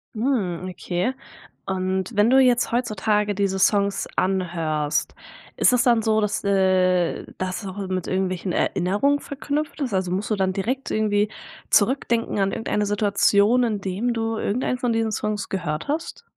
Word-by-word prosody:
Mhm, 210 -8 -1
okay 180 +5 -2 0.5
und 190 +2 -2
wenn 210 +3 +4
du 265 - +6
jetzt 250 -2 +3
heutzutage 210 -3 0
diese 195 -1 0
Songs 200 0 +2
anhörst, 165 -5 -1 0.4
ist - - +5
das 245 - +4
dann 235 -2 +4
so, 220 -1 +2
dass, 210 -1 -1
äh, 185 -3 +2
das 185 +2 -3
auch 190 +1 -6
mit 185 -2 -2
irgendwelchen 185 -1 -1
Erinnerungen 205 +14 +1
verknüpft 290 +2 -4
ist? 255 - -1
Also 185 -2 0
musst 195 +4 -2
du 215 - +1
dann 190 -1 0
direkt 245 +8 -2
irgendwie 210 -1 +1 0.4
zurückdenken 230 -1 +2
an 195 0 +1
irgendeine 210 -2 -1
Situation, 205 +3 +3
indem 210 +1 -1
du 225 -1 -2
irgendeinen 250 +4 -1
von 245 -1 -1
diesen 225 -1 0
Songs 210 -1 -2
gehört 160 -4 -3
hast? 330 +10 -4
205 Hz, 150 wpm, -23 LUFS, 185-230 Hz, 0.5 s, du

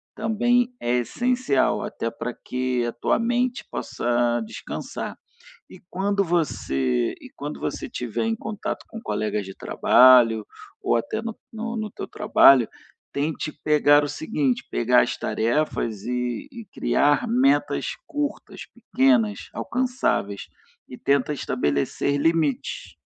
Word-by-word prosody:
também 240 +3 +1
é 120 +1 +1
essencial 245 - +1
até 115 - -3
pra 115 +1 -5
que 125 -1 -2
a 120 - -2
tua 120 - 0
mente 245 +1 0
possa 120 0 0
descansar. 220 - -6 0.5
E 185 - -13
quando 200 +2 0
você 70 - 0
e - - -11
quando - - -6
você - - -3
estiver 120 - -3
em 225 0 0
contato 215 -2 -5
com 225 - -7
colegas 105 - -2
de 95 - -9
trabalho 120 -4 +5 0.4
ou - - +1
até 120 - -2
no 225 -1 -6 0.2
no 225 -1 -4
teu - - -7
trabalho, 135 - +5 0.5
tente 150 +2 -2
pegar 145 -1 +5
o - - -1
seguinte: 145 -3 -1
pegar - - +4
as - - -3
tarefas 115 -3 -1
e 125 - -3
e 235 -4 -9
criar 145 - +2
metas 255 +4 +2 0.2
curtas, 295 -3 -4
pequenas, 125 - +1
alcançáveis 245 - -1 0.4
e 125 - -9
tenta 140 +1 +1
estabelecer 75 - -1
limites. 155 -3 0
145 Hz, 125 wpm, -24 LUFS, -, 0.5 s, trabalho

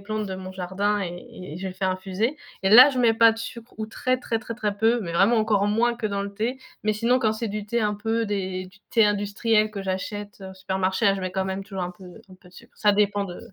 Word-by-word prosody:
plantes 215 +1 -3
de 190 - -4
mon 185 0 -7
jardin 190 +3 -1
et 180 - -2
et 175 -1 -10
et - - -7
je 190 - -5
les 185 - -8
fais 190 - -3
infuser, 190 +9 -1 0.2
et 190 - +2
là, 250 +6 +10
je 260 -3 -2
mets 235 -2 +4
pas 225 0 +6
de 225 - -9
sucre 230 +1 -8
ou 220 - -3
très 255 +3 -1
très 230 -2 -2
très 230 0 -7
très 210 -3 -2
peu, 225 +3 +2
mais 170 -2 -5
vraiment 195 +7 +4
encore 215 -2 +2
moins 235 +3 +2
que 230 -2 -3
dans 200 -1 -2
le 200 - -6
thé, 225 +6 -2 0.3
mais 215 0 +2
sinon 235 +4 +2
quand 220 -3 +1
c'est 225 0 -3
du 210 0 -5
thé 235 +2 0
un 210 -1 +1
peu 225 +2 -1
des 190 -3 -3
du 185 +2 -16
thé 225 -2 +4
industriel 210 +1 +1
que 200 -2 -6
j'achète 200 +2 -5
au 190 0 -9
supermarché, 190 +2 -1
la 195 - +5
je 195 - -5
mets 185 0 -4
quand 190 0 -1
même 190 +1 -3
toujours 195 -2 -5
un 180 - -5
peu 180 +1 -15 0.3
un - - -12
peu 180 -1 -19
de 180 - -21
sucre. 235 0 -16
Ça 210 -1 +4
dépend 205 0 +1
de 175 -2 -8
205 Hz, 280 wpm, -24 LUFS, 190-225 Hz, 0.3 s, là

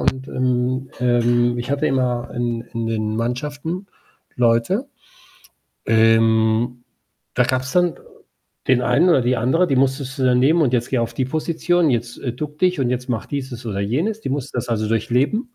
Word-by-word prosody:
und, 130 +1 -1
ähm 130 0 -1
ähm, 120 0 +2
ich 120 +3 -4
hatte 140 0 +1
immer 125 -2 -1
in 120 -1 -2
in 115 -1 -2
den 110 -1 -2
Mannschaften 145 - -3 0.5
Leute, 120 - +1 1.0
ähm, 115 +1 +3 0.5
da 125 - +3
gab's 130 0 -1
dann 175 -1 +2 0.7
den 125 -1 +4
einen 145 +10 +3
oder 135 -6 +4
die 125 +1 +1
andere, 130 +10 +2
die 135 - +1
musstest 135 0 0
du 130 - 0
dann 125 -1 +4
nehmen: 160 +6 +4
„Und 130 - +1
jetzt 120 -2 0
gehe 130 - +1
auf 115 0 -3
die 130 - 0
Position, 165 +3 0
jetzt, 120 0 -2
äh, 120 - -3
ducke 150 +3 -6
dich 180 -5 +2
und 125 -2 +1
jetzt 125 +1 -3
mache 115 -4 -3
dieses 130 -4 -5
oder 105 -4 -3
jenes“, 165 - -1
die - - -5
mussten 140 -2 -4
das 120 - -3
also 110 -2 -1
durchleben. 135 - 0
125 Hz, 180 wpm, -21 LUFS, 120-140 Hz, 1.0 s, den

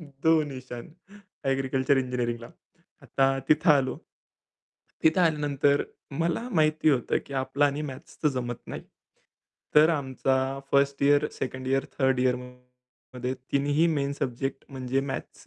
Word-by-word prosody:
दो 150 +1 0 0.2
निशान. 130 -3 -8 0.6
एग्रीकल्चर 135 0 +1
इंजिनिअरिंगला. 120 -2 -2 0.5
आता 135 - +1 0.2
तिथं 155 +2 +4
आलो. 135 -3 +3 1.1
तिथं 160 +3 +4
आल्यानंतर 145 -3 +2 0.4
मला 170 +9 0
माहिती 155 -4 +2
होतं 130 -5 +2
की 140 - -8
आपलं 145 +2 +1
आणि 145 +1 0
मॅथ्सच 130 - -13
तर 150 - +5
जमत 120 -1 -4
नाही. - - -6 0.9
तर 150 +1 +7
आमचा 135 -3 0 0.4
1st 140 0 +2
year, 145 +1 +4
2nd 130 0 -5
year, 135 0 +1
3rd 130 -1 +3
इयरमध्ये 125 0 -4
तिन्हीही 140 +4 +1
मेन 140 -1 -1
सब्जेक्ट 135 +2 -3
म्हणजे 130 -1 -2
मॅथ्स. 135 0 -6
135 Hz, 125 wpm, -27 LUFS, 130-145 Hz, 1.1 s, तर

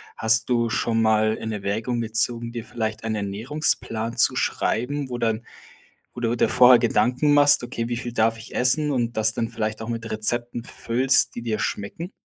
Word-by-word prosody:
Hast 110 0 +2
du 120 -1 +1
schon 115 0 -1
mal 110 0 +2
in 110 0 -6
Erwägung 110 +4 -3
gezogen, 115 +1 -1
dir 115 -2 -5
vielleicht 110 -1 -5
einen 110 -1 -2
Ernährungsplan 115 +2 -2
zu - - +4
schreiben, 135 +4 -2
wo 120 - -4
dann 115 -1 -2 0.7
wo 120 - -8
du 120 0 -1
dir - - +2
vorher 125 -1 +6
Gedanken 125 +5 +1
machst: 145 -2 +6
„Okay, 120 -1 -5
wie 120 - -3
viel 120 0 -6
darf 115 -1 +1
ich 115 - -12
essen“ 145 +4 +2
und 120 -4 -2
das 110 0 +4
dann 115 0 -3
vielleicht 110 -2 -4
auch 110 - -7
mit 115 -1 -5
Rezepten 120 +2 -2
füllst, 130 +3 +1
die 120 - -5
dir 110 -2 -3
schmecken? 165 - -5
115 Hz, 185 wpm, -23 LUFS, 110-125 Hz, 0.7 s, vorher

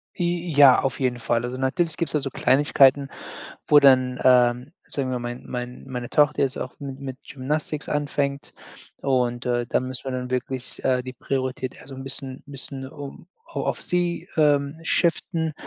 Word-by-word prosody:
Äh, 175 -1 -1
ja, 140 -3 +7
auf 135 - -2
jeden 125 -2 0
Fall. 115 0 0
Also, 125 +1 -4
natürlich 155 +5 0
gibt's 165 -4 -2
da 150 - +3
so 135 - -3
Kleinigkeiten, 140 0 +4 0.6
wo 150 - +8
dann, 130 -2 +4
ähm, 125 +1 +4 0.2
sagen 135 -2 -2
wir 125 -1 -1
mein 120 +1 -6
mein 125 0 -6
meine 125 -2 -5
Tochter 150 0 +3
jetzt 135 -1 +1
auch - - -5
mit 135 -1 -7
mit 130 -2 -6
Gymnastics 150 +2 -3
anfängt. 145 -1 -2 0.5
Und, 125 -2 0
äh, 120 -1 0
da - - +2
müssen 130 +1 -5
wir 130 - -2
dann 125 0 -4
wirklich, 130 0 -4
äh, 125 -1 +2
die 130 +1 -8
Priorität, 130 0 -3
also, 135 0 -10
'n 135 - -7
bisschen 135 -1 -6
bisschen 135 -1 -6
um 145 +4 -10 0.2
a - - -19
auf - - -2
sie, 175 -1 -1
ähm, 145 0 +3
shiften, 165 -2 +1
135 Hz, 175 wpm, -24 LUFS, 125-145 Hz, 0.6 s, wo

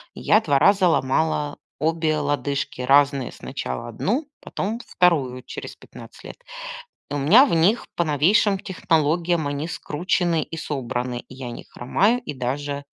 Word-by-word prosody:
Я 215 - +3
2 145 -8 +2
раза 195 0 +4
ломала 150 0 0 0.2
обе 160 0 0
лодыжки. 145 -2 -2
Разные. 140 0 +3
Сначала 65 - -6
1, 235 - -2
потом 220 +5 -4
2 135 -8 +1
через - - -8
15 - - -14
лет. - - -9 0.7
И - - -5
у 145 - -1
меня 195 - +6
в 255 - -2
них 185 +8 +3
по 170 - +1
новейшим 185 +7 +3
технологиям 165 -3 0
они 145 +3 -3
скручены 170 0 -1
и 165 - -8
собраны. 125 -5 -3
Я 130 -2 -7
не - - -8
хромаю 205 - +1
и 150 - -6
даже 140 +3 -3
150 Hz, 145 wpm, -23 LUFS, 140-175 Hz, 0.7 s, меня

